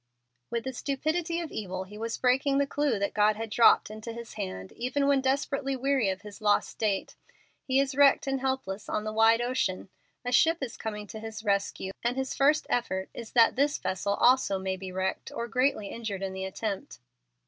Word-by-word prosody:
With 235 -1 -2
the 265 - -4
stupidity 315 +6 -1
of 330 - -6
evil 190 -3 -4
he 195 +2 -13
was 225 +2 -3
breaking 270 +2 +2
the 280 - +3
clew 285 -4 0
that 200 0 -1
God 210 0 +3
had 225 0 -5
dropped 230 -1 +5
into 220 +2 -7
his 235 0 -8
hand 95 0 -5
even 255 +4 -1
when 280 -1 +3
desperately 275 0 0
weary 265 -4 +1
of 190 +2 -4
his 210 +1 -11
lost 205 -1 +3
state. 205 -3 -2 0.5
He 265 0 +3
is 275 0 +1
wrecked 280 0 +5
and 270 -1 -1
helpless 240 -7 -3
on 210 - -1
the 215 0 -4
wide 225 +1 +5
ocean; 240 -7 -1 0.4
a 245 - -1
ship 325 +6 +4
is 260 -4 -4
coming 210 -1 -5
to 220 +2 -8
his 220 0 -7
rescue; 200 -2 -1
and 240 +2 0
his 265 0 -2
first 295 +2 +3
effort 190 -6 -1
is 230 -2 -9
that 230 -2 +5
this 285 +3 +2
vessel 200 +2 -1
also 245 -5 +4
may 190 0 -2
be 190 0 -7
wrecked 190 +1 -3
or 235 - -4
greatly 250 -4 +1
injured 210 -4 -5
in 190 -1 -3
the 190 0 -4
attempt. 195 +1 -4
230 Hz, 205 wpm, -28 LUFS, 200-265 Hz, 0.5 s, dropped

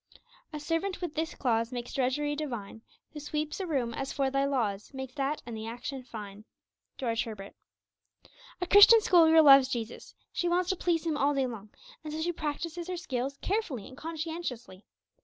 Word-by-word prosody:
'A 305 - -5
servant 330 +5 -2
with 350 -4 -4
this 320 +2 -3
clause 230 -2 0
Makes 245 -1 -5
drudgery 285 +3 0
divine; 240 -8 -5 0.3
Who 300 - -6
sweeps 300 +3 -3
a 380 - -3
room 255 -7 -1
as 270 +3 -4
for 270 -1 0
Thy 275 0 +1
laws, 220 -8 -1
Makes 265 -1 -6
that 280 +2 -2
and 235 -1 -6
the 220 0 -6
action 250 +4 -5
fine.' 210 -4 -9 0.5
George 230 -4 -1
Herbert. 205 -3 -8 1.1
A 360 - -1
Christian 410 +5 +8
school 345 -5 +5
girl 320 0 +7
loves 275 -2 +8
Jesus; 235 -3 -5 0.2
she 350 - 0
wants 355 +1 +1
to - - -1
please 340 -2 0
Him 315 -3 0
all 290 0 +2
day 270 -1 +2
long, 220 -4 -7 0.3
and 305 - -6
so 310 - -4
she 340 +2 0
practices 335 +2 -4
her 365 -1 -3
scales 275 -5 -3
carefully 360 - -2
and 260 - -12
conscientiously. 310 - -6
280 Hz, 185 wpm, -29 LUFS, 240-325 Hz, 1.1 s, Christian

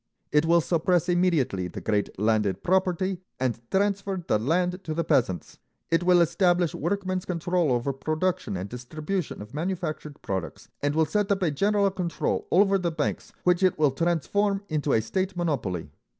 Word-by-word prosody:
It 150 +2 +3
will 170 0 +5
suppress 175 +2 +1
immediately 155 - +1
the - - -7
great 105 -2 -1
landed 105 -2 +1
property, 185 0 +1 0.2
and 125 -3 -1
transfer 195 -2 0
the 105 - +2
land 180 - 0
to 155 - -4
the 170 - 0
peasants. 95 - 0 0.3
It 165 - +3
will 175 0 +5
establish 175 0 +2
workmen's 185 +2 -2
control 175 -3 0
over 125 +3 0
production 155 - -1
and 90 +2 -4
distribution 150 - -4
of 105 - -14
manufactured 155 -3 -4
products, 95 -3 -4
and 145 +1 0
will 160 0 +4
set 205 +6 0
up 195 -1 +1
a 165 - +2
general 200 +6 +2
control 180 -3 -2
over 195 +2 +4
the 175 -2 0
banks, 160 - -3
which 180 0 +3
it 185 -2 +3
will 150 -3 +3
transform 175 +7 0
into 150 -2 0
a 110 - +3
state 185 - -2
monopoly. 95 - -2
170 Hz, 165 wpm, -26 LUFS, 140-185 Hz, 0.3 s, will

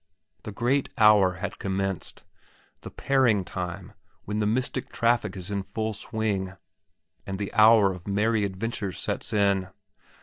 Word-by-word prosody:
The 110 - -7
great 125 +6 0
hour 105 -5 +6
had 90 +3 -6
commenced, 95 -1 -3 0.6
the - - -8
pairing 120 -8 +2
time 90 -1 -6 0.3
when 105 +1 -2
the 105 - +1
mystic 130 +3 -1
traffic 115 -4 +1
is 95 +2 -7
in 100 -1 -1
full 110 +3 -3
swing 100 -3 -3 0.7
and 95 -1 -3
the 100 0 -5
hour 110 -3 +6
of 90 0 -11
merry 105 +2 +1
adventures 100 -1 -3
sets - - -4
in. 100 -3 +2
105 Hz, 140 wpm, -26 LUFS, 95-110 Hz, 0.7 s, hour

